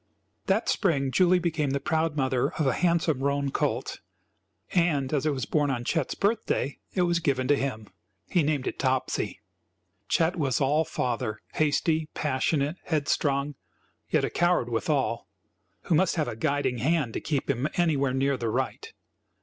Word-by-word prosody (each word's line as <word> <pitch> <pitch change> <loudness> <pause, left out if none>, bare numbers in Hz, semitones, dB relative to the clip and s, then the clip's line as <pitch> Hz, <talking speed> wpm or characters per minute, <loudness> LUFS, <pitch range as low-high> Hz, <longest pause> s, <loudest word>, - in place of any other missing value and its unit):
That 200 +4 +1
spring 140 -9 +1
Julie 185 +4 +4
became 165 -4 0
the 140 +1 0
proud 160 +2 0
mother 130 -2 +1
of 155 - -1
a 135 - +3
handsome 170 -4 +1
roan 140 0 0
colt, - - -1 0.7
and 155 -6 +1
as 150 0 +1
it - - +4
was 135 -3 -2
born 150 -2 +1
on 120 -3 -2
Chet's 160 -2 -1
birthday, 200 - 0 0.2
it 180 - +3
was 175 -1 +2
given 135 -5 0
to 145 - +6
him. 120 -6 -3 0.4
He 175 - +2
named 145 -3 0
it - - -4
Topsy. 130 -1 -1 0.7
Chet 170 +2 +2
was 135 -6 +1
all 150 +3 +2
father, 115 -5 -2
hasty, 155 +1 +1
passionate, 145 +2 0
headstrong, 145 -2 0 0.6
yet - - +2
a - - -4
coward 175 -8 +2
withal, 120 0 -1 0.6
who - - 0
must 180 +3 +3
have 155 -5 0
a 120 - -4
guiding 140 -1 0
hand 140 -2 +1
to - - -3
keep 145 -4 -2
him 140 +1 0
anywhere 150 -6 +2
near 135 0 +1
the 115 -2 -2
right. - - -3
145 Hz, 165 wpm, -27 LUFS, 135-165 Hz, 0.7 s, to